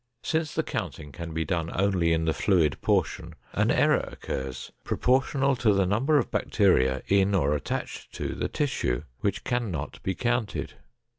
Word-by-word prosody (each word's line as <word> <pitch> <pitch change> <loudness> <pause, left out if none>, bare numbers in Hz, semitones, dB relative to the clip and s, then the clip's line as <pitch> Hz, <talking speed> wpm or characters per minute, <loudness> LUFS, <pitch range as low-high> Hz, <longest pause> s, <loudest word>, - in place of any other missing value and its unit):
Since 160 -2 -1
the - - +1
counting 75 - -5
can 85 +1 -7
be 80 0 -2
done 85 -3 -1
only 95 -3 +2
in 80 0 +1
the 80 - +2
fluid 80 -9 +2
portion, - - 0 0.2
an - - +2
error - - +3
occurs 65 -1 -5
proportional 135 +2 +2
to 115 -3 +3
the 100 -1 +3
number 125 +11 +2
of - - 0
bacteria 65 - +2
in 100 0 +3
or 75 -6 +2
attached 75 - -4
to - - -3
the - - -2
tissue 125 - -1 0.2
which 100 0 -1
cannot 105 -12 -3
be 95 - -2
counted. 120 -3 -1
95 Hz, 160 wpm, -27 LUFS, 80-120 Hz, 0.2 s, error